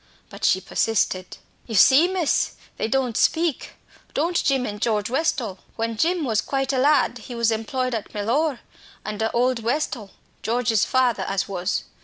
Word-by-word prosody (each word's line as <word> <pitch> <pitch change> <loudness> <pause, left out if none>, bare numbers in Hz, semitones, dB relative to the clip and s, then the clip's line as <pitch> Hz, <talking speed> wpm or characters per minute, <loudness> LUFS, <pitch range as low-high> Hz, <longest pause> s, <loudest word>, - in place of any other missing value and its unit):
But - - -11
she 175 +3 +4
persisted. 190 -2 -1 0.3
"You 225 - -4
see, 270 - +7
miss, 365 -5 0 0.2
they - - -1
don't 250 -1 0
speak, 325 +1 +1 0.4
don't 335 +4 +1
Jim 270 -3 +1
and 210 -2 -6
George 215 -2 0
Westall. 255 - -1 0.2
When 230 0 -2
Jim 335 +8 +1
was 220 -4 +1
quite 270 0 -1
a 260 - +1
lad 270 -3 +3
he 245 +2 -9
was 235 -1 +2
employed 255 +3 -2
at 220 -3 -4
Mellor, 240 +6 0 0.4
under 215 +1 -2
old 250 0 +1
Westall, 235 -3 -2 0.3
George's 230 -2 +1
father 250 -5 +2
as 195 0 -1
was. 185 -1 -2
240 Hz, 160 wpm, -23 LUFS, 215-270 Hz, 0.4 s, see